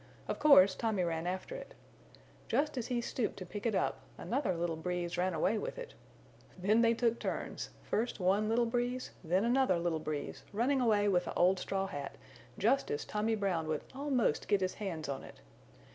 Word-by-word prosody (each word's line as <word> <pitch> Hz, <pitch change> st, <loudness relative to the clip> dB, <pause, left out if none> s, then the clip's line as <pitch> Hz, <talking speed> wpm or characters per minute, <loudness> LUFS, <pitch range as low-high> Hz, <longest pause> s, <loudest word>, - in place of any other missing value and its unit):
Of -, -, -3 dB
course 200 Hz, -11 st, +7 dB
Tommy 220 Hz, -5 st, 0 dB
ran 165 Hz, 0 st, -2 dB
after 185 Hz, -, -3 dB
it. -, -, -8 dB, 0.7 s
Just 300 Hz, +1 st, +1 dB
as 245 Hz, -2 st, -3 dB
he 245 Hz, -2 st, 0 dB
stooped 235 Hz, -1 st, -2 dB
to 185 Hz, -, -6 dB
pick 205 Hz, +5 st, -4 dB
it 220 Hz, -, 0 dB
up -, -, 0 dB, 0.2 s
another 235 Hz, -7 st, -1 dB
little 170 Hz, -1 st, -1 dB
Breeze 175 Hz, +1 st, -3 dB
ran 180 Hz, 0 st, 0 dB
away 200 Hz, +7 st, +1 dB
with -, -, -5 dB
it. -, -, -7 dB, 0.6 s
Then 205 Hz, +5 st, +3 dB
they 230 Hz, 0 st, +4 dB
took 235 Hz, 0 st, +1 dB
turns, -, -, -4 dB
first 230 Hz, +1 st, -1 dB
one 195 Hz, +4 st, +2 dB
little 235 Hz, +1 st, +3 dB
Breeze, 245 Hz, +2 st, -2 dB
then 180 Hz, +5 st, +2 dB
another 245 Hz, -6 st, +3 dB
little 170 Hz, -1 st, 0 dB
Breeze 155 Hz, -2 st, -4 dB
running 255 Hz, +6 st, +2 dB
away 210 Hz, -4 st, +3 dB
with 180 Hz, -3 st, +2 dB
the -, -, -5 dB
old 185 Hz, +2 st, +4 dB
straw 195 Hz, +1 st, -1 dB
hat 145 Hz, -8 st, -6 dB, 0.4 s
just 265 Hz, +7 st, +2 dB
as 145 Hz, -, -2 dB
Tommy 215 Hz, +2 st, 0 dB
Brown 185 Hz, -6 st, -1 dB
would 155 Hz, -2 st, -2 dB
almost 265 Hz, -, 0 dB
get 205 Hz, -2 st, +2 dB
his 185 Hz, 0 st, 0 dB
hands 175 Hz, -8 st, -4 dB
on 140 Hz, -1 st, -4 dB
it. -, -, -12 dB
205 Hz, 190 wpm, -33 LUFS, 180-235 Hz, 0.7 s, course